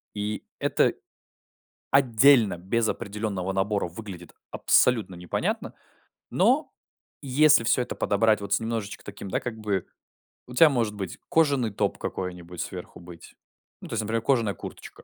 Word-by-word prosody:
И 105 Hz, +1 st, -3 dB, 0.2 s
это, -, -, +2 dB, 1.0 s
отдельно, 125 Hz, -5 st, +5 dB
без 110 Hz, +6 st, 0 dB
определённого 100 Hz, -2 st, -3 dB
набора 100 Hz, +1 st, 0 dB
выглядит 90 Hz, -2 st, -9 dB, 0.2 s
абсолютно 110 Hz, -7 st, +2 dB
непонятно. 90 Hz, 0 st, -3 dB, 0.6 s
Но, -, -, +2 dB, 0.5 s
если 140 Hz, -1 st, +4 dB
всё 115 Hz, +2 st, +2 dB
это -, -, -6 dB
подобрать, 110 Hz, +1 st, +2 dB
вот 100 Hz, -, -6 dB
с -, -, +1 dB
немножечко 115 Hz, -3 st, -4 dB
таким, 100 Hz, -1 st, -8 dB
да, -, -, -1 dB
как 120 Hz, -2 st, -5 dB
бы, 100 Hz, -4 st, -2 dB, 0.6 s
у 125 Hz, -, -10 dB
тя 155 Hz, +5 st, +7 dB
может 115 Hz, -6 st, -1 dB
быть, 95 Hz, -4 st, -6 dB
кожаный 140 Hz, -8 st, +2 dB
топ 100 Hz, -, -1 dB
какой-нибудь, 90 Hz, -2 st, -5 dB
сверху -, -, -7 dB
быть. 85 Hz, -1 st, -13 dB, 0.5 s
Ну -, -, -9 dB
то -, -, -6 dB
есть, 115 Hz, -, 0 dB
например, 110 Hz, +2 st, -1 dB
кожаная 115 Hz, -7 st, +2 dB
курточка, -, -, -10 dB
105 Hz, 145 wpm, -26 LUFS, 95-115 Hz, 1.0 s, тя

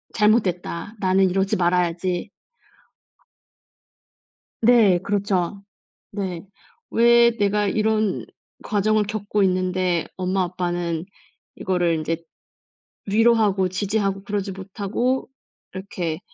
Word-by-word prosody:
'잘못됐다. 205 Hz, -2 st, +1 dB
나는 190 Hz, 0 st, +3 dB
이러지 195 Hz, +1 st, 0 dB
말아야지.' 175 Hz, +1 st, 0 dB, 2.3 s
네, 220 Hz, -6 st, +5 dB
그렇죠. 200 Hz, -1 st, -1 dB, 0.5 s
네. 190 Hz, -3 st, -4 dB, 0.4 s
'왜 235 Hz, 0 st, +5 dB
내가 205 Hz, -1 st, +1 dB
이런 215 Hz, 0 st, 0 dB, 0.4 s
과정을 215 Hz, 0 st, +1 dB
겪고 205 Hz, 0 st, -2 dB
있는데 185 Hz, -2 st, +1 dB
엄마 185 Hz, +1 st, 0 dB
아빠는 175 Hz, -2 st, -3 dB, 0.5 s
이거를 175 Hz, -3 st, 0 dB
인제 160 Hz, +1 st, -2 dB, 0.9 s
위로하고 210 Hz, -3 st, +3 dB
지지하고 195 Hz, +1 st, -1 dB
그러지 200 Hz, -1 st, -3 dB
못하고 200 Hz, +7 st, -2 dB, 0.4 s
이렇게 185 Hz, -4 st, -4 dB
195 Hz, 215 characters per minute, -22 LUFS, 180-210 Hz, 2.3 s, 네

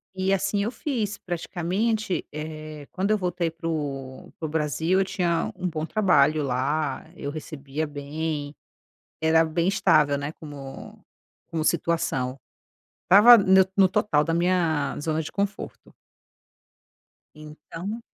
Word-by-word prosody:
E 190 Hz, +1 st, 0 dB
assim 200 Hz, +1 st, +1 dB
eu 220 Hz, -, -1 dB
fiz. 230 Hz, -5 st, -3 dB
Praticamente, 185 Hz, +4 st, -2 dB
eh, 155 Hz, -1 st, -7 dB
quando 190 Hz, +2 st, -1 dB
eu 215 Hz, -, +4 dB
voltei 180 Hz, -2 st, -1 dB
para 165 Hz, 0 st, -9 dB
o 135 Hz, -4 st, -5 dB
para 160 Hz, -, -3 dB
o -, -, -5 dB
Brasil, 160 Hz, +4 st, 0 dB
eu -, -, +3 dB
tinha 175 Hz, -3 st, -1 dB
um 185 Hz, -, -3 dB
bom 155 Hz, -2 st, -3 dB
trabalho 155 Hz, -7 st, +3 dB
lá; 140 Hz, +4 st, -1 dB
eu 140 Hz, -, -5 dB
recebia 150 Hz, -1 st, -5 dB
bem. 145 Hz, 0 st, -4 dB, 0.7 s
Era 160 Hz, 0 st, +4 dB
bem 165 Hz, +2 st, 0 dB
estável, 150 Hz, -7 st, +3 dB
né, 145 Hz, +2 st, -4 dB
como 140 Hz, -4 st, -10 dB, 0.5 s
como 160 Hz, -1 st, -2 dB
situação. 150 Hz, -6 st, 0 dB, 0.7 s
Estava 210 Hz, +7 st, +9 dB
neu 190 Hz, -2 st, +5 dB
no 195 Hz, -1 st, +6 dB
total 185 Hz, -7 st, +2 dB
da 165 Hz, -, -1 dB
minha 170 Hz, -3 st, +1 dB
zona 155 Hz, +1 st, -1 dB
de 155 Hz, -, -7 dB
conforto. 200 Hz, 0 st, -4 dB, 1.4 s
Então 165 Hz, +8 st, -8 dB
160 Hz, 130 wpm, -25 LUFS, 150-190 Hz, 1.4 s, Estava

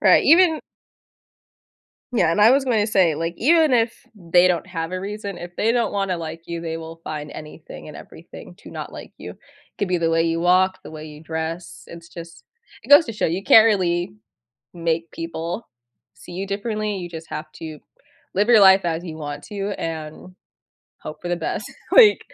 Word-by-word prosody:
Right, -, -, +5 dB
even 330 Hz, 0 st, +5 dB, 1.5 s
Yeah 195 Hz, -8 st, +3 dB
and 170 Hz, -, 0 dB
I 215 Hz, +3 st, +7 dB
was 275 Hz, +1 st, +3 dB
gonna 225 Hz, -5 st, +1 dB
say, 185 Hz, -6 st, +3 dB
like, 165 Hz, +2 st, -3 dB
even 315 Hz, +1 st, +4 dB
if 230 Hz, -1 st, +2 dB, 0.2 s
they 175 Hz, -1 st, +3 dB
don't 175 Hz, -2 st, 0 dB
have 165 Hz, -2 st, -4 dB
a 185 Hz, -, -3 dB
reason, 200 Hz, -1 st, -6 dB
if 175 Hz, 0 st, -9 dB
they 225 Hz, +2 st, +2 dB
don't 235 Hz, -3 st, 0 dB
wanna 195 Hz, -3 st, -1 dB
like 165 Hz, 0 st, -7 dB
you, 170 Hz, -1 st, -5 dB
they 165 Hz, -1 st, -4 dB
will 165 Hz, 0 st, -10 dB
find 150 Hz, -1 st, -6 dB
anything 150 Hz, 0 st, -11 dB
and -, -, -10 dB
everything -, -, -13 dB
to -, -, -13 dB
not -, -, -7 dB
like -, -, -10 dB
you. -, -, -9 dB, 0.4 s
Could 200 Hz, -, -1 dB
be 180 Hz, -, +1 dB
the 165 Hz, -1 st, 0 dB
way 165 Hz, 0 st, +2 dB
you 165 Hz, 0 st, 0 dB
walk, 185 Hz, +2 st, +3 dB
the -, -, -10 dB
way 155 Hz, -1 st, -9 dB
you 150 Hz, 0 st, -11 dB
dress. 160 Hz, -6 st, -5 dB
It's 170 Hz, 0 st, -12 dB
just 170 Hz, -1 st, -11 dB, 0.4 s
it -, -, -15 dB
goes 290 Hz, +3 st, +8 dB
to 230 Hz, -, -6 dB
show 210 Hz, -, -1 dB
you 175 Hz, +4 st, -2 dB
can't 220 Hz, +3 st, +7 dB
really 175 Hz, -, 0 dB, 0.6 s
make 165 Hz, -1 st, -2 dB
people 165 Hz, +5 st, -5 dB, 0.5 s
see -, -, -13 dB
you 190 Hz, +3 st, -4 dB
differently. 210 Hz, +1 st, -3 dB
You 175 Hz, -1 st, -6 dB
just 165 Hz, -1 st, -9 dB
have 155 Hz, 0 st, -6 dB
to 155 Hz, -2 st, -8 dB, 0.6 s
live 205 Hz, +4 st, +1 dB
your 225 Hz, -3 st, +7 dB
life 190 Hz, 0 st, +7 dB
as 170 Hz, 0 st, -2 dB
you 160 Hz, -3 st, -7 dB
want 145 Hz, -1 st, -6 dB
to 200 Hz, -1 st, -4 dB
and 160 Hz, +2 st, -6 dB, 0.7 s
hope 155 Hz, -, -9 dB
for 175 Hz, -, -4 dB
the 175 Hz, -, 0 dB
best. 165 Hz, -, -4 dB, 0.3 s
Like, 445 Hz, -4 st, +7 dB
175 Hz, 195 wpm, -22 LUFS, 165-205 Hz, 1.5 s, goes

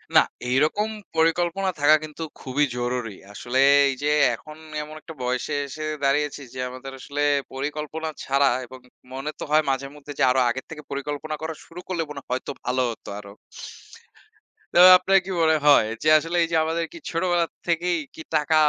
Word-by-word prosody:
না, -, -, +10 dB, 0.3 s
এইরকম 155 Hz, +11 st, +2 dB, 0.3 s
পরিকল্পনা 175 Hz, +4 st, +1 dB
থাকা 150 Hz, +2 st, +6 dB
কিন্তু 155 Hz, +1 st, -7 dB, 0.2 s
খুবই 140 Hz, +3 st, +1 dB
জরুরি। 120 Hz, -3 st, -2 dB, 0.2 s
আসলে 125 Hz, +5 st, -2 dB, 0.3 s
এই -, -, -1 dB
যে 150 Hz, -, +2 dB, 0.3 s
এখন 155 Hz, 0 st, -13 dB, 0.3 s
এমন 155 Hz, +1 st, -10 dB
একটা 165 Hz, -, -10 dB
বয়সে 125 Hz, +4 st, -1 dB
এসে 155 Hz, +3 st, -7 dB, 0.2 s
দাঁড়িয়েছি। 145 Hz, +1 st, +1 dB
যে 130 Hz, -, -8 dB
আমাদের 130 Hz, +2 st, -8 dB
আসলে 145 Hz, +2 st, -4 dB, 0.3 s
পরিকল্পনা 150 Hz, +3 st, -4 dB
ছাড়া 140 Hz, 0 st, +3 dB, 0.2 s
এবং 130 Hz, +2 st, -12 dB, 0.3 s
মনে 135 Hz, +3 st, -4 dB
তো -, -, -4 dB
হয় 155 Hz, +1 st, +5 dB
মাঝে 135 Hz, +1 st, -2 dB
মধ্যে 145 Hz, 0 st, -10 dB
যে, -, -, +3 dB
আরো 130 Hz, -, +2 dB
আগের 130 Hz, +2 st, -3 dB
থেকে 150 Hz, -2 st, -9 dB
পরিকল্পনা 145 Hz, +2 st, -4 dB
করা 160 Hz, 0 st, -3 dB
শুরু 175 Hz, +2 st, -10 dB
করলে 175 Hz, -3 st, -1 dB
মনে 145 Hz, -, -6 dB
হয় -, -, -64 dB
হয়তো 130 Hz, -, -2 dB
ভালো 130 Hz, +1 st, +1 dB
হতো 115 Hz, -, -10 dB
আরো। 100 Hz, -1 st, -11 dB, 1.4 s
তো 175 Hz, -, +4 dB, 0.2 s
আপনার 195 Hz, +1 st, +3 dB
কি 195 Hz, -, -7 dB
মনে 160 Hz, -1 st, +4 dB
হয় 140 Hz, -6 st, +7 dB, 0.2 s
যে 155 Hz, -, 0 dB
আসলে 165 Hz, +3 st, -3 dB
এই -, -, 0 dB
যে -, -, +1 dB
আমাদের 165 Hz, +1 st, -1 dB
কি -, -, -9 dB
ছোটবেলা 175 Hz, 0 st, +1 dB, 0.2 s
থেকেই 175 Hz, +1 st, +1 dB, 0.2 s
কি -, -, -8 dB
টাকা 155 Hz, +1 st, +2 dB
150 Hz, 180 wpm, -24 LUFS, 135-165 Hz, 1.4 s, না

